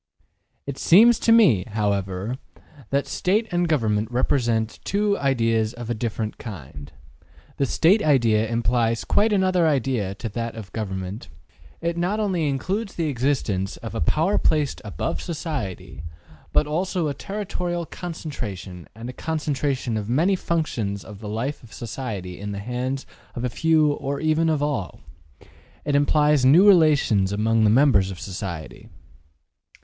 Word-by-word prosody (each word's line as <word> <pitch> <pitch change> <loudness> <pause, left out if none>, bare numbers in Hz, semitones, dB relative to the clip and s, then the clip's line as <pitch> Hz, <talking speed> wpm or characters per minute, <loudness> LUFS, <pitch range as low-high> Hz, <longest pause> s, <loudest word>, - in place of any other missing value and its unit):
``It 140 -1 -5
seems 225 +7 +6
to 230 - +2
me, 200 - +6
however, 100 +2 -1 0.5
that 140 +1 +1
State 210 +4 0
and 175 0 +1
government 110 -7 +1
represent 120 -3 0
two 205 +1 +1
ideas 115 -5 +1
of 120 -1 -5
a - - +2
different 110 -1 -3
kind. 75 - -9 0.7
The 140 - +1
State 185 - +4
idea 115 - +3
implies 115 0 +1
quite 215 +1 +3
another 185 -4 +3
idea 125 -9 0
to 115 - -5
that 115 +2 -4
of 110 -4 -9
government. 95 - -5 0.5
It 170 0 -2
not 185 +5 0
only 185 -7 0
includes 195 +10 -2
the 165 -3 -1
existence 120 -8 -1
of - - -8
a - - -3
power 160 - +2
placed 150 -3 +1
above 105 - -3
society, 150 - -5 0.5
but - - +3
also 170 +2 -1
a 145 - -1
territorial 175 -1 -4
concentration 115 - -7
and 115 +2 -8
a 125 - -6
concentration 140 -6 -2
of 105 0 -4
many 165 +10 +3
functions 120 - -2
of 105 -3 -10
the 105 -1 -7
life 120 +7 -3
of 115 - -16
society 105 -6 -6
in 100 0 -5
the - - -5
hands 125 +5 -3 0.3
of 120 - -4
a 125 - 0
few 155 +2 +3
or 140 -1 -3
even 160 +1 +2
of 150 -2 +1
all. 140 - -3 0.8
It 145 - 0
implies 150 0 +3
new 160 +10 +7
relations 150 - +4
among 110 +2 +2
the - - +5
members 110 -5 +4
of 95 -2 -7
society. 90 -5 -7
130 Hz, 150 wpm, -23 LUFS, 110-160 Hz, 0.8 s, new